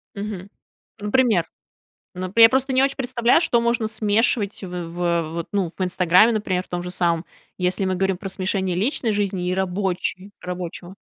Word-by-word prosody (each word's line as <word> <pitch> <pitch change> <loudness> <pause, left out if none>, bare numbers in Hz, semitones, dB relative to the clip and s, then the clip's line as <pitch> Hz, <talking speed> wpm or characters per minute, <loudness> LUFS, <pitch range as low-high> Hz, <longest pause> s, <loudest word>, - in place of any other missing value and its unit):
Мгм. 200 -2 -6 0.5
Например? 210 -5 +2 0.7
Ну, 185 0 -5
п 230 - +3
я 225 - +10
просто 265 +1 0
не 260 - +4
очень 275 0 +1
представляю, 250 +2 +2
что 235 -8 +2
можно 235 -1 0
смешивать 215 -1 0
в - - -5 0.2
в 170 -1 -1
вот, 170 -1 -4
ну, 195 -4 0
в 190 - -1
"Инстаграме", 180 +4 +4
например, 185 -4 -1
в - - -23
том 175 0 -3
же 180 - -6
самом. 170 -1 0 0.3
Если 185 +1 0
мы 185 0 0
говорим 190 0 0
про 195 +1 -6
смешение 190 -1 -1
личной 225 - 0
жизни 195 -3 -1
и 180 - 0
рабочей 190 +1 -2
рабочего. 180 +1 -6
190 Hz, 180 wpm, -22 LUFS, 180-220 Hz, 0.7 s, я